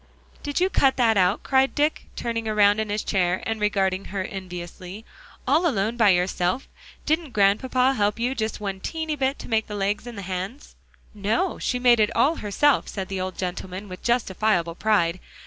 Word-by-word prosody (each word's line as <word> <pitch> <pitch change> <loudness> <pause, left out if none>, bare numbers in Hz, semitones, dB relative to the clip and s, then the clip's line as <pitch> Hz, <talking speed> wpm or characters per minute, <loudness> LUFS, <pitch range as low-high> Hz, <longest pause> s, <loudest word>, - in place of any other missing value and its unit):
"Did 290 +1 -2
you 365 - +3
cut 275 -8 +2
that 230 -3 +3
out?" 190 +2 +2
cried 265 0 +2
Dick, 300 +1 0
turning 230 -1 -3
around 210 -1 +4
in 220 -1 -2
his 205 +1 -1
chair, 185 -2 0
and 225 -1 -3
regarding 195 -2 0
her 195 -1 -3
enviously, 185 +2 -8 0.4
"all 315 +7 +3
alone 220 -5 0
by 225 -4 +4
yourself? 180 +5 +1 0.4
Didn't 315 -4 0
Grandpapa 250 +6 +3
help 210 -3 0
you 245 +3 0
just 220 -4 -3
one 195 -2 -4
teeny 315 - -3
bit 270 0 0
to - - -9
make 220 -2 0
the 210 - -6
legs 205 +3 -1
and 235 -3 -8
the 200 - -6
hands?" 190 +8 -6 0.4
"No; 215 - -1
she 250 - -1
made 245 -2 +4
it 210 - +4
all 285 +8 +3
herself," 255 +7 +2
said 190 -1 -5
the 190 -1 -3
old 185 0 -4
gentleman, 185 +2 -5
with 185 -1 -9
justifiable 210 -7 +1
pride. 185 -3 +1
210 Hz, 185 wpm, -24 LUFS, 190-250 Hz, 0.4 s, around